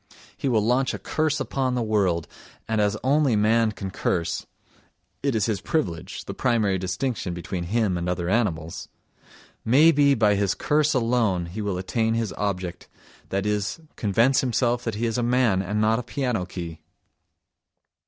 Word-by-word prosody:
He 135 - -2
will 110 -4 +2
launch 130 +4 +1
a - - -4
curse 155 -1 -1
upon 130 -2 -1
the 120 - 0
world, 95 -7 +1 0.4
and 110 -1 +1
as 105 0 +1
only 140 -2 +3
man 110 +1 +3
can 95 -2 -6
curse 85 -3 -1 0.7
(it 140 -3 0
is 105 -3 +2
his 105 -4 -1
privilege, 90 - -3
the - - -5
primary 110 -6 +1
distinction 95 0 -2
between 85 0 -4
him 100 -2 0
and 85 +1 -2
other 90 -1 -2
animals), 90 -7 -1 0.7
may 145 +8 +6
be 140 -2 +4
by 105 -3 +3
his 100 -1 +1
curse 150 0 +1
alone 115 -7 +1
he 90 +6 -6
will 100 -3 -2
attain 110 +4 0
his 115 -6 -1
object—that 95 +1 -5
is, 105 +5 -1 0.2
convince 115 +6 +3
himself 120 -1 0
that 115 -3 -2
he 115 +3 -1
is 115 +1 -1
a - - +1
man 120 -5 +2
and 105 +3 -2
not 110 +2 +3
a - - -4
piano 125 -6 -2
key! 85 -3 -7
110 Hz, 165 wpm, -24 LUFS, 95-125 Hz, 0.7 s, may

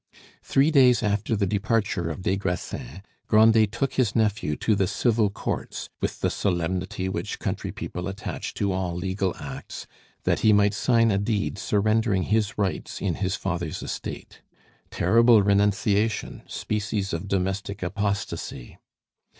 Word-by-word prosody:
Three 140 +4 +3
days 125 -5 +5
after 105 +1 0
the 100 -1 +1
departure 100 -3 0
of 85 +3 -6
des 95 - +1
Grassins, 95 -3 -4 0.2
Grandet 110 -1 +5
took 125 +4 -1
his 120 -6 +1
nephew 105 -8 +1
to 110 - +1
the 95 -2 +1
Civil 110 0 +2
courts, 100 - -4
with - - -3
the - - +1
solemnity 90 0 -1
which 95 - -3
country - - -3
people 90 +1 -5
attach 95 +2 -5
to 100 -1 0
all 95 -2 -2
legal 95 +1 -1
acts, - - -7 0.4
that - - +1
he 110 - +5
might 105 0 +4
sign 115 +1 +3
a 100 - +2
deed 100 -1 -1
surrendering 105 0 +1
his 110 +3 0
rights 100 -3 -2
in - - 0
his 95 -1 -1
father's 85 -5 -3
estate. - - -6 0.5
Terrible 115 +3 +5
renunciation! 100 +2 +1
species 105 -2 -2
of 85 +4 -3
domestic 95 +1 -2
apostasy! 95 -9 -3
100 Hz, 140 wpm, -25 LUFS, 95-110 Hz, 0.5 s, days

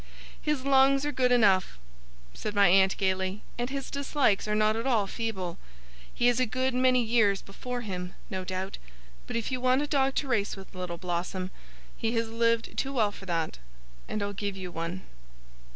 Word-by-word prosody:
'His 300 -3 -1
lungs 275 0 +5
are 295 - 0
good 255 -2 +2
enough,' 195 - +4 0.6
said 210 - -5
my 200 -2 +6
aunt, 190 +1 +5
gaily, 190 0 -1 0.2
'and 240 +1 -1
his 275 -1 -4
dislikes 280 -7 +1
are 210 - +1
not 215 0 +3
at 230 +3 -2
all 225 -6 +3
feeble. 195 -5 -4 0.5
He 240 - -1
has 245 0 +4
a 255 - +2
good 255 +3 0
many 255 0 +4
years 220 -4 +3
before 245 +5 -5
him, 180 -4 -5
no 185 -1 -4
doubt. 185 +1 -4 0.5
But - - -4
if 230 +1 -2
you 255 -1 -2
want 255 +2 +3
a - - 0
dog 270 -2 +2
to 285 - 0
race 220 -6 0
with, 195 0 -12
Little 180 -2 -5
Blossom, 180 +1 -3 0.4
he 225 +1 -1
has 230 -1 0
lived 230 0 +1
too 270 +1 -1
well 220 -5 +2
for 195 -1 -12
that, 165 - -2 0.5
and 215 - -2
I'll 200 0 -3
give 200 0 -3
you 185 -2 -6
one. 170 +3 -4
215 Hz, 190 wpm, -28 LUFS, 190-255 Hz, 0.6 s, my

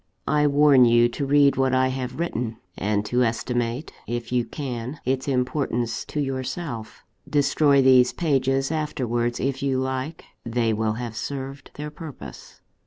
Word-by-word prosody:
I 150 0 +3
warn 140 -3 +6
you 120 0 +5
to 140 +3 -3
read 140 -1 +4
what 130 -1 +2
I 130 0 +3
have 130 +1 -4
written, 120 -9 -2 0.2
and 105 +1 -1
to 125 +3 +2
estimate, 120 +3 -2 0.2
if 120 0 -4
you 125 -1 +1
can, 130 0 -5
its 130 +1 -1
importance 125 -3 -1
to 150 - -4
yourself. 130 -3 -4 0.3
Destroy 145 -1 +3
these 130 -1 +6
pages 135 -3 +1
afterwards 120 -6 -1
if 135 0 -1
you 135 -1 +1
like 130 +4 -3 0.2
they 115 -1 0
will 110 0 0
have 115 0 -5
served 135 +3 -5
their 150 +1 -6
purpose. 150 -2 -10
130 Hz, 150 wpm, -24 LUFS, 120-140 Hz, 0.3 s, warn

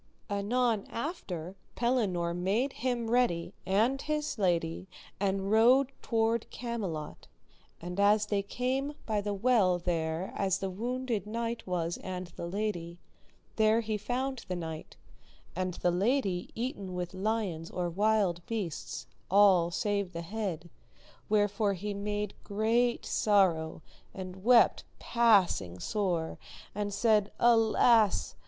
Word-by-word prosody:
Anon 220 +2 0
after 195 - -5 0.2
Pellinore 205 -9 0
made 200 +10 0
him 240 -1 -2
ready, 235 -9 +1
and 225 +8 +2
his 300 -5 -2
lady, 170 -2 0 0.3
[and] 195 0 0
rode 250 +5 +5
toward 225 0 0
Camelot; 205 -11 -5 0.5
and 180 +3 -6
as 205 +1 +4
they 205 -1 0
came 260 +7 -2
by 215 -2 0
the 205 0 -2
well 200 -4 +3
there 170 0 -2
as 195 -1 +1
the 195 -1 -3
wounded 235 0 -3
knight 230 +1 -3
was 170 -2 -1
and 185 -1 -6
the 170 - -5
lady, 175 -3 -3 0.6
there 220 +1 +4
he 215 -1 -2
found 250 +4 -3
the 185 - -2
knight, 160 -2 -7 0.6
and 185 -1 -2
the 175 - +1
lady 195 -1 0
eaten 205 -6 -4
with 180 0 -4
lions 190 -5 -2
or 180 -1 -2
wild 195 -1 +1
beasts, 205 -9 -4 0.2
all 190 -3 +5
save 200 +1 -1
the 170 0 -5
head, 175 -3 -4 0.6
wherefore 205 -1 +2
he 205 +3 -4
made 205 0 -3
great 230 +4 +1
sorrow, 175 -7 +2 0.3
and 185 0 -7
wept 240 0 +5
passing 195 - +3
sore, 175 - -1 0.3
and 205 0 -2
said, 210 0 +2
Alas! 225 - +4
205 Hz, 125 wpm, -30 LUFS, 180-230 Hz, 0.6 s, rode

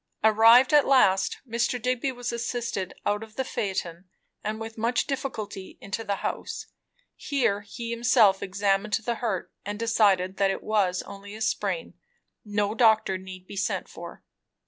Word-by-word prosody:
Arrived 225 +5 +6
at 295 -1 +6
last, 195 -8 +4
Mr. 240 +2 0
Digby 255 +2 0
was 245 -1 -4
assisted 235 -5 -3
out 205 +1 +1
of 220 -1 -11
the 265 - -1
phaeton, 185 -7 -3 0.4
and 215 +1 -3
with 225 0 -7
much 230 +2 0
difficulty 220 -8 -5
into 200 +3 -5
the 205 -2 -1
house. - - -4 0.5
Here 235 -8 0
he 230 +3 -7
himself 230 -4 +4
examined 195 +1 0
the 230 +2 0
hurt, 215 -7 -2
and 205 +1 -4
decided 200 -5 +2
that 195 -1 +3
it 195 - -3
was 195 -4 +1
only 200 +1 -10
a 220 - -10
sprain; - - -1 0.5
no 205 0 -1
doctor 220 -5 +3
need 185 -1 -10
be 200 - -10
sent 195 - -1
for. - - -10
215 Hz, 155 wpm, -26 LUFS, 195-235 Hz, 0.5 s, Arrived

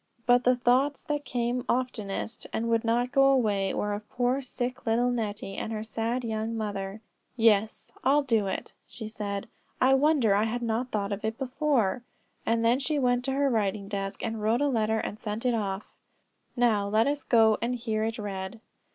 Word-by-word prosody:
But 245 0 +4
the 250 0 +5
thoughts 255 +4 +2
that 295 -1 -2
came 245 0 -1
oftenest, 225 -3 -2
and 230 +1 -1
would 230 -1 +2
not 240 +2 +1
go 275 -1 +5
away, 215 -8 +3
were 210 0 -1
of 210 +1 -6
poor 250 +2 0
sick 250 -1 -4
little 240 +2 +2
Nettie, 210 -4 -3
and 225 - -4
her 215 -1 -3
sad 230 +3 -2
young 225 0 -2
mother. 205 -1 -4 0.4
"Yes, 220 -2 +2
I'll 285 +3 +4
do 225 -6 +1
it," 190 - -4
she 220 -3 -7
said; 205 -2 -4 0.3
"I 260 +1 +5
wonder 270 -6 +4
I 205 +2 +3
had 240 +2 -2
not 235 +2 -1
thought 205 -1 -1
of 200 +1 -3
it 220 +1 -2
before." 255 -5 0 0.5
Then 230 +2 +3
she 295 +2 -1
went 245 -2 +2
to 270 - 0
her 280 +1 +2
writing 205 -3 0
desk, 195 0 -4
and 225 -1 -3
wrote 225 +4 +2
a 290 - +3
letter 220 -3 +1
and 215 -1 -4
sent 215 +3 -4
it 250 - +3
off. 200 -3 -3 0.6
Now 225 -5 +2
let 215 +2 +3
us 285 0 -1
go 220 -3 +4
and 240 +2 0
hear 220 -3 -2
it 225 +2 -2
read. 195 0 -5
230 Hz, 190 wpm, -28 LUFS, 215-250 Hz, 0.6 s, the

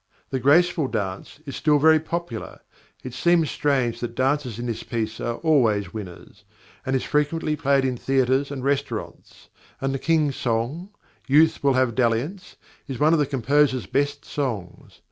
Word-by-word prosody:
The 130 - -1
"Graceful 160 +3 +3
Dance" 100 +4 -5
is 140 - -6
still 150 -1 +3
very 160 +2 +5
popular 160 -7 -5 0.4
(it 130 - -7
seems 165 +3 +2
strange 130 -5 0
that 120 -1 -5
dances 130 -3 0
in 120 - -5
this 115 -2 -3
piece 110 -1 -4
are 120 - -2
always 115 - +1
winners), 95 -6 -9 0.4
and 130 - -1
is 130 - 0
frequently 150 +1 0
played 140 -2 +2
in 130 -2 -1
theatres 135 +2 +1
and 135 -3 -6
restaurants; 140 -4 -4 0.3
and 135 0 -1
the 135 - -2
King's 155 -3 +1
song, 125 - -2 0.4
"Youth 155 +3 +4
will 140 -1 +4
have 130 -2 +2
dalliance," 130 - -1 0.3
is 135 -3 -5
one 155 +5 +3
of 165 - +3
the 145 - +1
composer's 135 -2 +1
best 145 +7 -1
songs. 115 -11 -5
135 Hz, 165 wpm, -23 LUFS, 120-150 Hz, 0.4 s, very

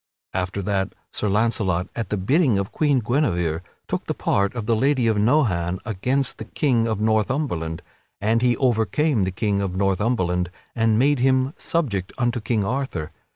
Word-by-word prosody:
After 95 +1 -2
that 95 0 -1 0.2
Sir 105 - -1
Launcelot, 100 -4 +1
at 115 - -3
the 105 - -1
bidding 130 - +2
of 100 0 -2
Queen 145 -4 +2
Guinevere, 90 - 0 0.3
took - - -3
the - - -1
part 100 +4 0
of 115 -3 -3
the 115 - +2
Lady 130 +1 +2
of 110 -2 +2
Nohan 105 - +2
against 125 +6 -1
the 110 - -6
King 120 -2 +1
of 110 -2 -1
Northumberland, 110 - 0 0.4
and 110 +3 +1
he 120 -2 +3
overcame 120 0 +2
the - - -1
King 100 +1 0
of 95 -2 -2
Northumberland 95 -2 +1 0.3
and 115 -2 +2
made 140 +3 +3
him 130 +2 +2
subject 105 - -2
unto 120 -2 0
King 105 -2 0
Arthur. 130 - -3
110 Hz, 165 wpm, -23 LUFS, 95-130 Hz, 0.4 s, he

